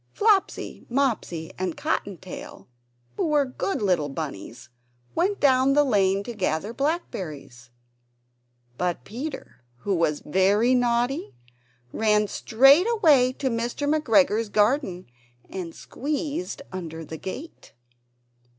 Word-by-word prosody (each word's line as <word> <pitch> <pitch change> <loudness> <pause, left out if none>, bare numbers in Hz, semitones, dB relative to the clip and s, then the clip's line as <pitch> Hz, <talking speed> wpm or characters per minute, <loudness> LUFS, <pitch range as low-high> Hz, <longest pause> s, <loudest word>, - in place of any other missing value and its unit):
Flopsy, 410 -3 +1
Mopsy, 235 -11 -1
and 185 -3 -2
Cotton 200 -3 -2
tail, 185 +1 -10 0.5
who - - 0
were 295 -2 +3
good 260 - -3
little 175 -7 +1
bunnies, 120 -5 -7 0.4
went 395 +3 0
down 265 -1 +4
the 295 +1 +5
lane 200 -6 +2
to 240 - -6
gather 200 0 -2
blackberries. 170 - -4 1.1
But 175 -8 -1
Peter, 255 - -7 0.2
who 200 - -1
was 165 -4 +1
very 200 +9 +3
naughty, 245 - 0 0.6
ran 210 -1 +2
straight 270 - +5
away 305 - +4
to 265 -1 -2
Mr. 235 +5 -2
McGregor's 225 -7 +3
garden, 210 -3 +1 0.5
and 175 -3 -6
squeezed 295 +2 -4
under 165 -3 -6
the 160 - -7
gate! 270 - -8
220 Hz, 115 wpm, -25 LUFS, 180-280 Hz, 1.1 s, the